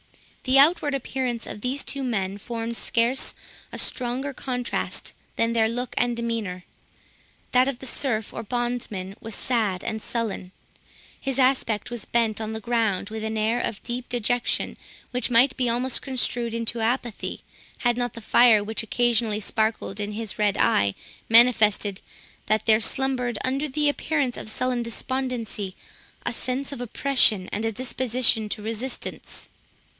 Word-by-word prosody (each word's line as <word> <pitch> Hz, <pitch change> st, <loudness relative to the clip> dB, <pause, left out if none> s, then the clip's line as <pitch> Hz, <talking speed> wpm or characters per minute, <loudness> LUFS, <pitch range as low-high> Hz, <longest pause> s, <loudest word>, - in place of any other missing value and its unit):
The 260 Hz, +1 st, +4 dB
outward 290 Hz, 0 st, +5 dB
appearance 255 Hz, -3 st, -2 dB
of 210 Hz, -, -7 dB
these 260 Hz, +4 st, -2 dB
two 280 Hz, -, -2 dB
men 200 Hz, -5 st, -2 dB
formed 230 Hz, +1 st, -4 dB
scarce 235 Hz, +3 st, +1 dB, 0.4 s
a -, -, -6 dB
stronger 255 Hz, +3 st, +1 dB
contrast 250 Hz, -2 st, -2 dB, 0.2 s
than 230 Hz, 0 st, +1 dB
their 220 Hz, -1 st, +3 dB
look 245 Hz, +2 st, -3 dB
and 240 Hz, -1 st, +1 dB
demeanour. 225 Hz, -6 st, -3 dB, 0.9 s
That 255 Hz, +1 st, +5 dB
of 275 Hz, -3 st, -2 dB
the 265 Hz, -, -9 dB
serf, 230 Hz, -4 st, -1 dB
or -, -, -4 dB
bondsman, 230 Hz, -5 st, -3 dB
was 225 Hz, -2 st, -3 dB
sad 215 Hz, -7 st, 0 dB
and 220 Hz, -1 st, -3 dB
sullen; 215 Hz, -6 st, -3 dB, 0.7 s
his 270 Hz, -1 st, -3 dB
aspect 255 Hz, -5 st, +2 dB
was 240 Hz, -3 st, -4 dB
bent 225 Hz, -2 st, +1 dB
on 220 Hz, 0 st, -3 dB
the 220 Hz, -, -4 dB
ground 220 Hz, -3 st, 0 dB
with 220 Hz, 0 st, -4 dB
an 220 Hz, 0 st, -2 dB
appearance 220 Hz, +3 st, +1 dB
of 205 Hz, -, -7 dB
deep 245 Hz, +1 st, -4 dB
dejection, 245 Hz, +1 st, +1 dB, 0.4 s
which 250 Hz, +1 st, 0 dB
might 245 Hz, +3 st, +5 dB
be 250 Hz, -2 st, +1 dB
almost 245 Hz, +2 st, +1 dB
construed 240 Hz, -3 st, -1 dB
into 230 Hz, 0 st, -1 dB
apathy, 240 Hz, -1 st, -2 dB, 0.4 s
had 240 Hz, -1 st, +1 dB
not 245 Hz, -1 st, -2 dB
the 230 Hz, -, -7 dB
fire 220 Hz, -1 st, +5 dB
which 220 Hz, +2 st, -2 dB
occasionally 230 Hz, -2 st, +1 dB
sparkled 220 Hz, -1 st, -1 dB
in 205 Hz, 0 st, -3 dB
his 220 Hz, -1 st, -5 dB
red 205 Hz, -2 st, +2 dB
eye 100 Hz, -1 st, +3 dB, 0.3 s
manifested 220 Hz, -4 st, +5 dB, 0.5 s
that 215 Hz, 0 st, +1 dB
there 220 Hz, 0 st, +5 dB
slumbered, 250 Hz, -3 st, 0 dB
under 270 Hz, +3 st, 0 dB
the 295 Hz, +2 st, +1 dB
appearance 290 Hz, -3 st, 0 dB
of -, -, -4 dB
sullen 250 Hz, +2 st, 0 dB
despondency, 235 Hz, -4 st, -3 dB, 0.5 s
a -, -, -1 dB
sense 265 Hz, +2 st, -2 dB
of 275 Hz, -, -6 dB
oppression, 245 Hz, -5 st, +4 dB
and 210 Hz, -, -2 dB
a 225 Hz, -, 0 dB
disposition 245 Hz, -2 st, +2 dB
to 210 Hz, -, -3 dB
resistance. 230 Hz, +4 st, -4 dB
235 Hz, 155 wpm, -25 LUFS, 220-255 Hz, 0.9 s, outward